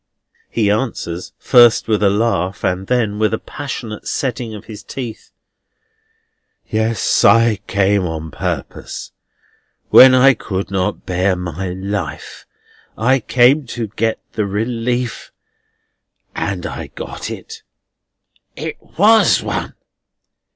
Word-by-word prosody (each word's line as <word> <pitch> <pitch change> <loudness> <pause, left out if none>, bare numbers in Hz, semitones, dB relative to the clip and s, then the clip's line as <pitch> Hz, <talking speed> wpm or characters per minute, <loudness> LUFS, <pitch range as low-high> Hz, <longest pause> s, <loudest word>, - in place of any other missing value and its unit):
He 105 -3 +1
answers 105 -6 -3
first 120 -3 +5
with 110 -2 +1
a 100 - +4
laugh, 100 -3 0
and 95 +1 -1
then 110 -5 0
with 110 0 +2
a - - -4
passionate 120 -7 -7
setting 120 -4 -3
of 105 - -10
his 110 -2 -9
teeth: 120 -4 -7 1.4
"Yes, 110 0 0
I 115 +1 +5
came 100 -1 +2
on 80 -1 -5
purpose. - - -5 0.8
When 130 0 +9
I 135 +2 +6
could 100 -4 -4
not 95 +1 -2
bear 95 +1 +1
my 90 +1 -4
life, 95 -4 -5 0.5
I 130 +4 +3
came 125 +4 +3
to 115 -3 -3
get 110 +2 -1
the 105 -2 -2
relief, 120 +4 -2 1.0
and - - -3
I - - -5
got - - -7
it. 450 0 -8 0.9
It - - -5 0.2
WAS 220 +1 +5
one! - - -3
110 Hz, 115 wpm, -18 LUFS, 95-120 Hz, 1.4 s, When